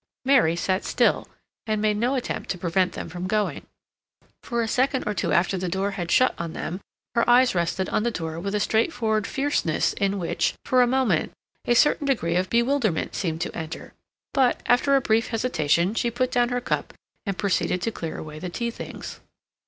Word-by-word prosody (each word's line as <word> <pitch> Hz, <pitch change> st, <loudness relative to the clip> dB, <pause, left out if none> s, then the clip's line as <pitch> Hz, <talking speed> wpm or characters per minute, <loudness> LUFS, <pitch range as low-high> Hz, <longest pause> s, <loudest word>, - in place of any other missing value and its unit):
Mary 255 Hz, -12 st, +4 dB
sat 185 Hz, +2 st, 0 dB
still -, -, +1 dB, 0.4 s
and 215 Hz, -1 st, 0 dB
made 210 Hz, 0 st, +2 dB
no 240 Hz, +6 st, +1 dB
attempt 255 Hz, -, -3 dB
to 180 Hz, -, -2 dB
prevent 180 Hz, +1 st, +1 dB
them -, -, -6 dB
from 175 Hz, +2 st, -5 dB
going. 210 Hz, +1 st, -1 dB, 0.7 s
For 235 Hz, -2 st, -1 dB
a -, -, -2 dB
second 260 Hz, +3 st, +1 dB
or 210 Hz, -, -1 dB
two -, -, -1 dB
after 185 Hz, +1 st, +2 dB
the 180 Hz, 0 st, -2 dB
door 195 Hz, +3 st, -1 dB
had 175 Hz, -4 st, -4 dB
shut 255 Hz, +7 st, +4 dB
on 170 Hz, -1 st, -4 dB
them 180 Hz, +4 st, -5 dB, 0.3 s
her 235 Hz, 0 st, +2 dB
eyes 250 Hz, +1 st, +5 dB
rested 180 Hz, +1 st, 0 dB
on -, -, +1 dB
the 240 Hz, -, +1 dB
door 165 Hz, -6 st, -4 dB
with 200 Hz, +4 st, -3 dB
a -, -, +1 dB
straightforward 220 Hz, -1 st, +1 dB
fierceness 275 Hz, -, 0 dB
in 200 Hz, 0 st, 0 dB
which, 175 Hz, -3 st, -1 dB
for 255 Hz, -1 st, +4 dB
a 245 Hz, -, +5 dB
moment, 245 Hz, -10 st, +1 dB, 0.3 s
a 240 Hz, -, +3 dB
certain 290 Hz, +3 st, +3 dB
degree 170 Hz, -11 st, +1 dB
of 185 Hz, +1 st, +1 dB
bewilderment 235 Hz, -, +1 dB
seemed 165 Hz, -3 st, -2 dB
to -, -, -3 dB
enter; 160 Hz, -1 st, -6 dB, 0.4 s
but, 260 Hz, -3 st, +2 dB
after 260 Hz, +3 st, +4 dB
a 270 Hz, -, +4 dB
brief 225 Hz, -1 st, +2 dB
hesitation, 180 Hz, -6 st, +1 dB
she 235 Hz, +1 st, 0 dB
put 255 Hz, +2 st, -1 dB
down 245 Hz, -1 st, +2 dB
her 245 Hz, 0 st, 0 dB
cup -, -, -2 dB, 0.3 s
and 195 Hz, -2 st, -2 dB
proceeded 190 Hz, -2 st, 0 dB
to 230 Hz, -, 0 dB
clear 165 Hz, -6 st, -5 dB
away 155 Hz, -1 st, -8 dB
the 180 Hz, -, -5 dB
tea 235 Hz, +6 st, -3 dB
things. -, -, -8 dB
210 Hz, 200 wpm, -25 LUFS, 180-245 Hz, 0.7 s, eyes